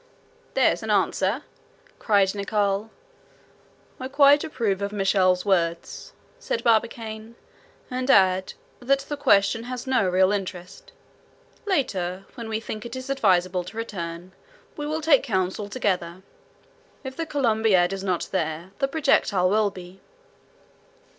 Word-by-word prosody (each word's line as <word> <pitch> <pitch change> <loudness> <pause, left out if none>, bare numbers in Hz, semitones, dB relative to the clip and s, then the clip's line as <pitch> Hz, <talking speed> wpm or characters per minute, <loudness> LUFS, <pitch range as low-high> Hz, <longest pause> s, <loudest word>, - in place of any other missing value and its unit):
"There's - - +3
an - - -6
answer!" - - +1 0.6
cried 200 -3 +2
Nicholl. 205 0 -1 1.1
"I 260 - -4
quite 280 +1 +5
approve 225 -11 -2
of 200 0 -2
Michel's 190 -2 +2
words," 170 -4 -1 0.3
said - - -3
Barbicane; 225 -1 -1 0.6
"and 255 +1 -3
add, 190 -4 +4 0.3
that 275 +2 +1
the 285 +2 -5
question 225 -5 +2
has 250 -1 -6
no 255 -8 +2
real 185 +1 +3
interest. 185 -2 -5 0.8
Later, 195 - -1
when 230 -3 -7
we 220 0 -1
think 215 -1 -6
it 235 +1 -7
is 260 +1 -5
advisable 185 -7 +2
to 185 +5 -11
return, 175 -5 -6 0.4
we 295 -1 -5
will 310 +1 -2
take 300 -4 +4
counsel 200 -3 -2
together. 185 -6 -2 0.8
If 265 -1 -7
the 330 +2 -4
Columbiad 220 - +2
is 195 0 -5
not 185 -3 -1
there, 165 0 -3
the 275 - +1
projectile 270 - +2
will 215 0 +3
be." 185 0 -12
205 Hz, 130 wpm, -24 LUFS, 185-255 Hz, 1.1 s, quite